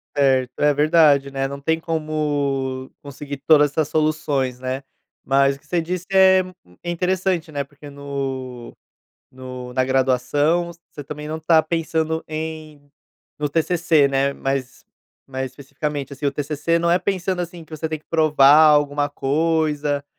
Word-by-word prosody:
Certo, 130 -3 +2
é 150 0 +4
verdade, 150 -2 +4
né, 135 0 -1
não 140 +1 -7
tem 160 +3 0
como 145 -5 -2
conseguir 140 0 -7
todas 150 -2 +6
essas 155 0 0
soluções, 150 -5 0
né. 130 +1 -4 0.4
Mas 135 0 +3
o - - -17
que - - -29
você 175 +2 0
disse 180 +2 -4
é, 190 -1 +6 0.2
hum, 90 0 -22
é 175 - -5
interessante, 180 -1 -1
né, 145 -1 -2
porque 145 +1 -14
no 135 -3 -6 0.6
no 125 -1 -8
na 130 0 +2
graduação, 135 +6 +1 0.2
você 145 - -9
também 150 +2 -7
não 155 +1 -4
está 160 0 +4
pensando 160 0 -1
em 155 -1 -6 0.6
no 150 -1 -1
TCC, 165 -1 +2
né, 140 0 0
mais 135 -2 -4 0.4
mais 130 -1 -4
especificamente, 140 +1 -5
assim. 145 +1 -6
O 140 - +2
TCC 150 +3 -1
não 170 0 +1
é 175 - +3
pensando 185 0 -2
assim, 175 -1 -7
que 160 0 -9
você 160 +1 -3
tem 155 0 -3
que 150 - -26
provar 150 -3 +5
alguma 145 -1 +2
coisa. 150 0 0
145 Hz, 160 wpm, -21 LUFS, 135-160 Hz, 0.6 s, todas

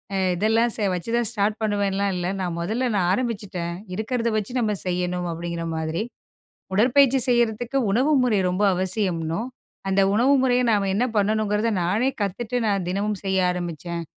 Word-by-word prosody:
அ - - +1 0.2
இதெல்லாம் 225 +5 +2 0.2
வச்சுதான் 230 +6 -1
ஸ்டார்ட் 210 -1 0
பண்ணுவேன்லாம் 200 -2 0
இல்ல. 175 -1 -2
நான், 180 -3 -2
1ல 225 +9 -1
நான் 180 -2 +2
ஆரம்பிச்சுட்டேன் 200 -7 -3 0.2
இருக்கறத 235 +2 -1
வச்சு 215 +3 -3
நம்ம 210 -2 +1
செய்யணும் 180 0 -1
அப்டிங்கிற 170 0 -4
மாதிரி. 160 +2 -2 0.7
உடற்பயிற்சி 260 +5 +4
செய்யறதுக்கு 240 +1 +1
உணவு 260 +9 +2
முறை 230 -5 +2
ரொம்ப 185 +3 -1
அவசியம்னு, 180 -3 -1 0.5
அந்த 195 +1 +2
உணவு 245 +6 +4
முறைய 250 -1 +3
நாம 200 -2 +2
என்ன 220 +5 +2
பண்ணணுங்கறத, 210 +1 +1
நானே 210 +9 +1
கத்துட்டு 225 +5 -3
நான் 195 -4 0
தினமும் 200 +2 -1
செய்ய 190 0 +1
ஆரம்பிச்சேன் 170 -1 -4
205 Hz, 145 wpm, -23 LUFS, 180-230 Hz, 0.7 s, உடற்பயிற்சி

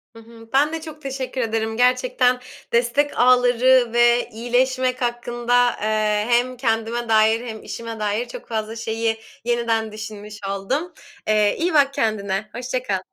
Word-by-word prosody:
Hı 230 - -11
hı. 225 0 -15
Ben 295 +4 +3
de 325 - -3
çok 310 -1 -10
teşekkür 265 -2 -4
ederim. 220 -1 -2
Gerçekten 250 0 +2 0.3
destek 245 +5 +1
ağları 250 0 +5
ve 240 0 +3
iyileşmek 255 +3 0
hakkında, 240 0 +1
eee, 215 -1 +1
hem 245 +1 +2
kendime 230 -1 -1
dair 220 +2 +3
hem 220 -1 -7
işime 230 -1 -7
dair 210 +3 -1
çok 240 - -10
fazla 220 -1 -3
şeyi 225 0 -2 0.3
yeniden 230 -2 0
düşünmüş 210 0 -8
oldum. 270 - -2 0.3
Eee, 210 -1 +3
iyi 340 0 0
bak 280 -2 +4
kendine, 215 -2 -1
hoşça 250 +1 -3
kal. 195 -5 -1
235 Hz, 145 wpm, -22 LUFS, 220-255 Hz, 0.3 s, ağları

